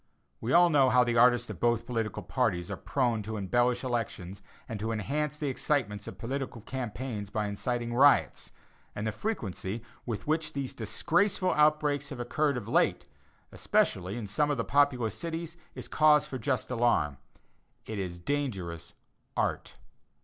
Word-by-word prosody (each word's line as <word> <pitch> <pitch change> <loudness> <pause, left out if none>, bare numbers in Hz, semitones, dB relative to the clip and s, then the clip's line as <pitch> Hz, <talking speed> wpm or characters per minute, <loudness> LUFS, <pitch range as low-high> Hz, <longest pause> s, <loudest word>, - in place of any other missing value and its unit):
We 115 - -3
all 175 +2 +6
know 135 -3 +5
how 125 0 +5
the 120 -1 0
"artists" 120 0 +5
of - - -9
both 120 -1 +2
political 115 -4 -3
parties 85 0 -1
are - - -2
prone 120 -5 0
to 110 +1 -5
embellish 120 +6 +1
elections 105 -6 -3 0.3
and 110 - -5
to 110 +2 -2
enhance 145 +7 -2
the 150 - -4
excitements 125 -7 -1
of - - -8
political 130 -1 -4
campaigns 120 -3 -5
by 105 0 -1
inciting 120 +3 -2
riots, 140 +4 +4 0.4
and 105 - -3
the 110 - 0
frequency 110 - -4 0.2
with 115 -3 -3
which 155 0 0
these 140 -2 -3
disgraceful 185 - +1
outbreaks 150 -2 +2
have 135 - -7
occurred 140 +3 0
of 110 -4 -6
late, - - +2 0.5
especially 95 +4 0
in 115 - -4
some 145 +9 +1
of 145 - 0
the 115 - -1
populous 135 -6 +2
cities, 165 0 -5 0.2
is - - -7
cause 150 -1 +5
for 135 -4 -6
just 130 0 -1
alarm. 115 - +2 0.7
It 110 -2 -5
is 90 -2 -4
dangerous 90 - -3 0.4
"art." - - -1
120 Hz, 160 wpm, -29 LUFS, 110-145 Hz, 0.7 s, all